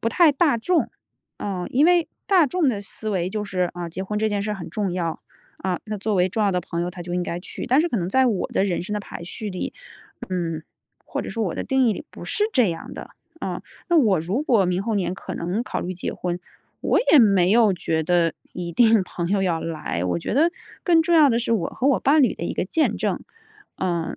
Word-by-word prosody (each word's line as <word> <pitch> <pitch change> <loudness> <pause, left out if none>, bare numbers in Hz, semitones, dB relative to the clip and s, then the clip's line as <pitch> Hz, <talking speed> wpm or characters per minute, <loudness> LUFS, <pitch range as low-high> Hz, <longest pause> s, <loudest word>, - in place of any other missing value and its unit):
不 230 - +1
太 320 +7 +5
大 280 -4 +2
众， 345 +9 +1 0.5
啊。 190 -3 -3
因 280 +5 +4
为 350 -1 +4 0.2
大 365 -6 +5
众 325 +1 +1
的 215 -5 -1
思 215 +2 -6
维 185 -3 -1
就 210 +1 -2
是， 185 -3 -1
啊， 175 -1 -5
结 185 +3 -5
婚 210 +2 -2
这 220 +1 +1
件 205 -1 -1
事 210 - -2
儿 - - -1
很 185 -4 -7
重 205 -4 -2
要， 170 -3 -2 0.4
啊， 185 -1 -2
那 215 0 -3
作 210 +1 -1
为 180 -1 +3
重 215 +3 0
要 200 - +2
的 180 - +1
朋 170 -1 -3
友， 175 - -2
她 180 0 -10
就 175 0 -5
应 180 - 0
该 175 0 -4
去。 180 - -7
但 260 +4 +4
是 340 - +1
可 245 - -1
能 175 -4 -1
在 260 +7 +3
我 210 -7 0
的 - - +2
人 180 -4 -1
生 190 - -5
的 210 - -1
排 170 - -8
序 210 +4 -6
里， 185 -2 -4 0.6
嗯， 165 -4 -2 0.4
或 - - -3
者 - - -7
说 225 - -2
我 180 - -2
的 - - -3
定 265 -2 +3
义 - - +3
里 295 - -7
不 - - -10
是 420 - 0
这 245 -8 +4
样 165 - -7
的， - - -8 0.3
啊， - - -4 0.3
那 345 - +4
我 205 - +3
如 190 - -1
果 230 -9 +4
明 180 0 0
后 220 +2 -1
年 185 -3 0
可 190 - -7
能 180 +6 -2
考 - - -3
虑 180 - -3
结 180 - -4
婚， 175 -1 -3 0.4
我 - - +2
也 305 - +9
没 195 -6 +5
有 220 -1 +5
觉 160 -2 -1
得 170 0 +2 0.2
一 175 -1 -5
定 225 +2 +5
朋 170 -1 -4
友 195 0 +1
要 170 -4 0
来。 160 - -3
我 90 -1 0
觉 - - -4
得 320 +6 +4 0.3
更 340 -4 +4
重 340 +1 +2
要 310 -3 +7
的 230 - +2
是 235 -1 -1
我 195 -7 +1
和 255 - -2
我 280 - +3
伴 295 +2 +4
侣 245 - +3
的 - - -9
一 - - -2
个 - - -1
见 310 - +1
证。 - - -1 0.6
呃 170 -3 -2
200 Hz, 275 characters per minute, -23 LUFS, 175-240 Hz, 0.6 s, 也